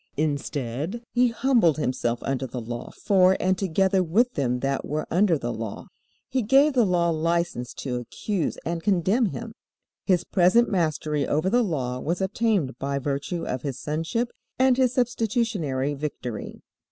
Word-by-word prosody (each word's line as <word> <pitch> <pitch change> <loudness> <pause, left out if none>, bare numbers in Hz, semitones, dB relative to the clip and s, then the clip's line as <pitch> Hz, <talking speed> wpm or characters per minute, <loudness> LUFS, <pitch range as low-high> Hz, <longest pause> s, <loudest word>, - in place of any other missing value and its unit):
Instead, 145 - -2
He 250 0 +4
humbled 235 - +3
Himself 125 -4 -1
under 135 -1 -2
the 125 +1 -5
Law 120 +1 -6
for 190 -1 +3
and 185 0 +2
together 190 +1 +2
with 220 +9 +2
them 125 -3 -1
that 135 0 -1
were 150 +1 -3
under 180 -1 +3
the 120 -3 -3
Law. 110 -2 -6 0.4
He 260 - 0
gave 270 +6 +4
the 240 -5 +3
Law 170 -2 +2
license 165 -5 -1
to 125 -3 -3
accuse 175 - -3
and 170 0 -2
condemn 200 +5 +2
Him. 230 +3 -6 0.5
His 180 -3 +3
present 195 +7 +4
mastery 155 -5 0
over 155 +6 +1
the 245 +2 +4
Law 130 - -2
was 170 +6 -2
obtained 190 - 0
by 140 0 -2
virtue 140 +5 -3
of 125 0 -3
His 135 -3 -4
Sonship 165 +11 -2 0.3
and 260 -1 +4
His 255 -1 +3
substitutionary 225 - 0
victory. 135 -6 -6
170 Hz, 155 wpm, -25 LUFS, 140-210 Hz, 0.5 s, He